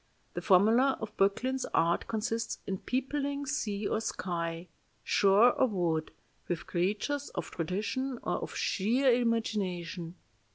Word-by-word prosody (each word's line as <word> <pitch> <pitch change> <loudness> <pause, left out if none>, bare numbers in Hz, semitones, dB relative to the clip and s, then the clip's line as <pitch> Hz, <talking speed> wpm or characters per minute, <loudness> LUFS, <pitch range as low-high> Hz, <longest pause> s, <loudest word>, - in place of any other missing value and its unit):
The - - -4
formula 225 +8 +4
of 220 -1 -6
Böcklin's 255 +7 +1
art 170 +1 +2
consists 225 +1 -2
in 190 -1 -3
peopling 280 +2 -2
sea 215 -8 -2
or 215 - 0
sky, 170 -4 -3 0.4
shore 205 +5 +5
or 260 - +3
wood, 170 -7 -1 0.4
with 175 -2 -3
creatures 210 +11 -1
of - - -4
tradition 215 - -2
or - - 0
of - - -6
sheer 245 +7 +2
imagination. 195 -8 -1
210 Hz, 125 wpm, -30 LUFS, 180-255 Hz, 0.4 s, shore